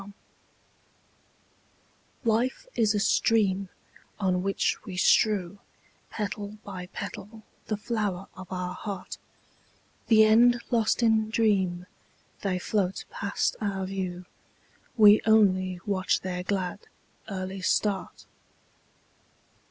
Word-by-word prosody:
Petals 200 0 -12 2.1
Life 245 - 0
is 215 -2 +2
a - - +1
stream 200 -2 +2 0.5
On 185 -2 +1
which 195 +1 -1
we 185 -2 -7
strew 200 -1 +2 0.5
Petal 210 0 -5
by 185 -3 -7
petal 215 +3 -8 0.2
the 215 - -1
flower 205 -4 -2
of 185 0 -11
our 180 -1 -3
heart; 195 -1 -7 0.9
The 220 -1 +6
end 240 +3 +5
lost 230 0 +2
in 220 -1 +3
dream, 190 -6 +1 0.6
They 190 -2 -1
float 190 0 -1
past 200 0 -1
our 195 -2 -2
view, 185 -2 -4 0.7
We 210 -1 +8
only 185 -4 +3
watch 190 -2 0
their 180 -1 -3
glad, 185 +1 -3 0.4
early 190 -1 -5
start. 195 +2 -1
200 Hz, 105 wpm, -27 LUFS, 185-215 Hz, 2.1 s, We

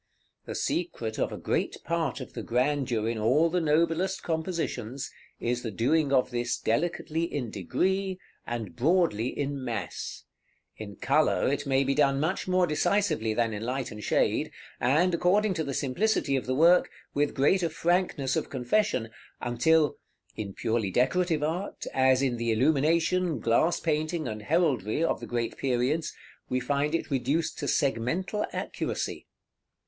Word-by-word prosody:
The - - -6
secret 120 -11 -2
of - - 0
a - - -5
great - - -1
part 165 -4 -1
of 130 - -9
the 115 - -5
grandeur 125 -1 0
in 115 -1 -1
all 145 +10 +3
the 180 0 +1
noblest 165 +4 +1
compositions 160 - -3 0.3
is 120 +1 -1
the 115 - -4
doing 140 +8 +1
of 130 -2 +3
this 120 0 -1
delicately 165 +5 -1
in 125 -6 -3
degree, 190 - -1 0.3
and 110 -7 -4
broadly 155 - +2
in 140 0 -3
mass; 115 -4 -5 0.5
in 105 -2 -8
color - - +2
it - - -3
may 135 0 +3
be 135 0 +1
done 140 -1 +3
much 165 +7 -1
more 185 0 +3
decisively 155 - +1
than 115 -1 +1
in 105 - -4
light 125 +2 -3
and 105 0 -8
shade, - - +1 0.3
and, 155 +9 +3
according 190 +4 +3
to 160 -3 -2
the 140 - -4
simplicity 140 +1 +1
of 130 - -2
the 130 - 0
work, 170 +5 +5 0.2
with 145 0 0
greater 170 +6 +3
frankness 165 -5 0
of - - -2
confession, 130 - 0 0.3
until, 150 +6 +2 0.4
in 100 -3 -5
purely 115 -3 0
decorative 160 - +1
art, 170 +6 -3
as 130 0 +4
in 125 -3 0
the 115 0 0
illumination, 160 +6 +2
glass 120 +10 +2
painting, 155 -1 -1
and 110 -2 -5
heraldry 145 - +1
of - - +1
the - - -8
great 120 -1 -2
periods, 135 +5 0 0.4
we 130 - +1
find 145 +4 0
it 165 - -3
reduced 145 +5 0
to - - -3
segmental 150 - 0
accuracy. - - -4
140 Hz, 155 wpm, -28 LUFS, 120-165 Hz, 0.5 s, work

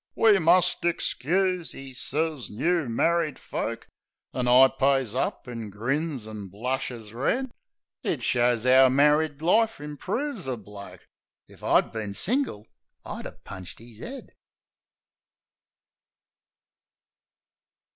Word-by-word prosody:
"We 215 -3 +5
must 175 +1 +4
ixcuse," 175 +1 0
'e 135 -1 -9
sez, 150 +1 -2
"new 160 +5 0
married 165 +4 +1
folk." 115 +1 -4 0.5
An' 125 -1 -1
I 125 +2 +8
pays 135 -4 +1
up. 130 - -2
an' 115 -3 -6
grins, 130 +4 -2
an' 105 -2 -7
blushes 115 +1 -4
red... 240 - -1 0.5
It - - -2
shows 120 -1 +2
'ow 130 +1 +7
married 150 +2 +3
life 225 +4 +3
improves 185 - -4
a 130 -2 -2
bloke: 100 -1 -11 0.4
If - - -18
I'd - - +3
bin 105 -3 -5
single 225 - -1 0.4
I'd - - -6
'a' - - -8
punched 95 -2 -9
'is 115 0 -14
'ead! 270 +1 -8
135 Hz, 115 wpm, -26 LUFS, 115-170 Hz, 0.5 s, I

